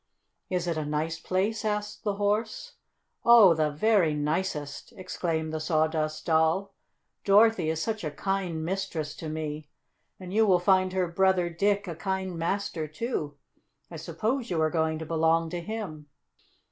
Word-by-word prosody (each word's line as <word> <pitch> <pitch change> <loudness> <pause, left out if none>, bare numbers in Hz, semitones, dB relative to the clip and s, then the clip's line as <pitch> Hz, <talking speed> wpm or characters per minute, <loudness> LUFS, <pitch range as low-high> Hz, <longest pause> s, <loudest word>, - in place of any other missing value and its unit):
"Is 180 -1 -1
it 170 -2 -1
a 155 - -1
nice 150 +2 -2
place?" 200 +5 -1
asked 210 -1 -3
the 205 -2 -1
Horse. 215 - -1 0.5
"Oh, 230 -7 +8
the 155 -1 +1
very 165 0 +2
nicest!" 150 -1 -3
exclaimed 165 -4 -3
the 155 - -2
Sawdust 155 -1 0
Doll. 165 +5 +2 0.5
"Dorothy 205 -4 +4
is 160 0 -1
such 220 -3 -3
a 155 - -1
kind 175 0 -2
mistress 175 -5 -3
to 160 - -6
me. 155 -1 -5 0.5
And 185 0 -8
you 220 +1 +4
will 185 -2 +5
find 185 +1 +3
her 185 -1 +1
brother 180 0 +2
Dick 200 +3 0
a 170 - -4
kind 190 +1 -3
master, 165 -1 -2
too. 155 - -4 0.5
I 165 - -7
suppose 215 - -2
you 170 - -1
are 155 0 +2
going 160 -1 0
to 160 - -6
belong 165 0 +1
to 175 -1 -3
him." 170 -7 -6
175 Hz, 160 wpm, -27 LUFS, 160-200 Hz, 0.5 s, Oh